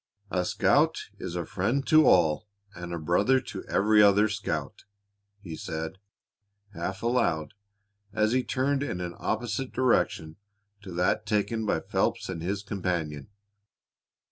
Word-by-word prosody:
"'A 90 -1 0
scout - - +2
is 85 - -5
a 85 -2 -2
friend 110 - -1
to 155 -1 +6
all 85 +2 +4 0.3
and 85 -1 -7
a 85 - -2
brother 95 +11 +2
to 130 - -8
every 105 +1 +4
other 105 +1 +5
scout,'" 90 -9 -4 0.6
he 85 -6 -7
said, 80 +3 -5 0.7
half 95 +3 -5
aloud, 85 - 0 0.6
as 110 0 +1
he 130 +1 +2
turned 135 +2 0
in 140 -11 -3
an 90 -1 -4
opposite 120 +3 -2
direction 90 -10 +1 0.4
to 95 - -9
that 90 +5 0
taken 105 +1 0
by - - +1
Phelps - - -1
and 85 -3 -4
his 100 +4 -3
companion. 85 -8 -3
100 Hz, 140 wpm, -27 LUFS, 85-110 Hz, 0.7 s, to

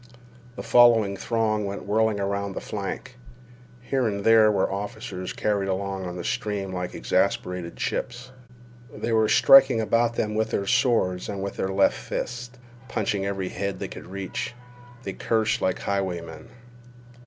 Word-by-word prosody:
The - - -6
following 115 -5 +5
throng 110 +1 0
went 100 0 -5
whirling 110 0 +1
around 100 0 -2
the - - -2
flank. 105 +4 -6 0.6
Here 130 0 0
and 100 -2 -3
there 110 -1 +6
were 95 -2 +1
officers 100 -1 -5
carried 100 -2 -1
along 95 0 -3
on 90 - -6
the 90 - -5
stream 100 -1 -2
like 90 -1 -4
exasperated 90 -2 -1
chips. 125 0 -4 0.6
They 115 - -4
were 110 -1 +3
striking 135 -3 +7
about 115 +1 +1
them 105 -2 -1
with 110 +1 0
their 100 - -1
swords 95 -5 +1
and 100 -1 -4
with 100 - -4
their 95 - -1
left 95 0 +3
fists, 125 +1 -5 0.3
punching 100 -4 -1
every 95 -2 -3
head 100 +1 -3
they - - -4
could - - -10
reach. 100 +5 -5 0.5
They - - -4
cursed 110 -1 0
like 95 - +1
highwaymen. 90 -5 -4
100 Hz, 155 wpm, -25 LUFS, 95-115 Hz, 0.6 s, striking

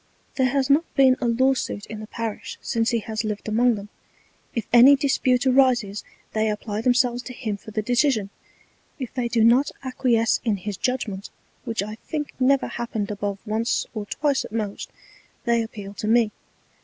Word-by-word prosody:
There 260 -1 +2
has 270 0 +1
not 290 +4 +2
been 265 -2 +6
a 245 - +1
Law 260 +3 +3
suit 205 -5 -4
in 215 - -8
the 215 - -8
Parish 225 -2 -5
since 230 -1 0
he 235 - +1
has 220 +1 -3
liv'd 210 -1 -4
among 235 +2 +3
them: 205 0 -8 0.7
If 230 -4 -1
any 250 +4 +9
Dispute 265 -2 +1
arises 250 -6 +3 0.3
they 220 0 +1
apply 210 0 -3
themselves 245 0 +2
to 250 - -8
him 230 -5 -3
for 210 +2 -12
the 215 0 -2
Decision, 240 -4 +1 0.7
if 255 -4 -6
they 250 -3 -1
do 230 -1 +2
not 245 +5 +5
acquiesce 245 -3 +1
in 220 -4 +1
his 205 +1 -5
Judgment, 210 -4 -2 0.4
which 225 -4 -1
I 215 +1 -7
think 295 -2 -3
never 270 +1 +3
happened 225 -4 -4
above 205 -1 -3
once 225 +2 0
or 210 -3 -5
twice 285 +2 0
at - - -9
most, 215 -3 -4 0.5
they 235 -1 +2
appeal 205 -3 -7
to 210 - -5
me. 225 -1 +3
230 Hz, 180 wpm, -24 LUFS, 215-255 Hz, 0.7 s, any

